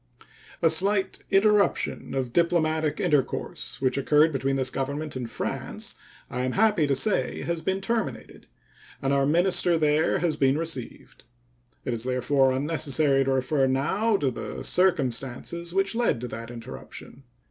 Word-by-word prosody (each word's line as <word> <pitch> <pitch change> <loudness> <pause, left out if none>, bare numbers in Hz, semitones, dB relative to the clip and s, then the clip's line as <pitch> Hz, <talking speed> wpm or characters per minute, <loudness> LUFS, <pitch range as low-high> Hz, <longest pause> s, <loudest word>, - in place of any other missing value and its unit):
A 165 - +5
slight 195 +4 +1
interruption 205 -4 +2
of 130 -3 -2
diplomatic 160 -3 +1
intercourse 150 -8 -1
which 130 +1 +2
occurred 150 +3 +4
between 135 -1 -1
this 130 -1 +1
Government 140 +2 -4
and 125 -3 -4
France, - - -4 0.3
I 125 +1 -3
am 130 - -1
happy 210 -7 +3
to 140 - +2
say, 205 +10 0
has 170 -1 -2
been 190 +3 -1
terminated, 195 - -3 0.5
and 135 0 0
our 140 0 +2
minister 175 +1 +3
there 155 0 +2
has 165 -4 -1
been 135 0 +3
received. 160 -10 -6 0.6
It 125 - -1
is 115 -1 -3
therefore 130 +1 +2
unnecessary 140 0 +1
to 135 - +1
refer 135 +1 +1
now 190 +12 +1
to 140 -7 0
the 120 - -6
circumstances 145 0 0
which 195 +2 +1
led 230 - +1
to 125 - -4
that 115 +1 -7
interruption. 120 +2 -9
150 Hz, 145 wpm, -26 LUFS, 130-175 Hz, 0.6 s, A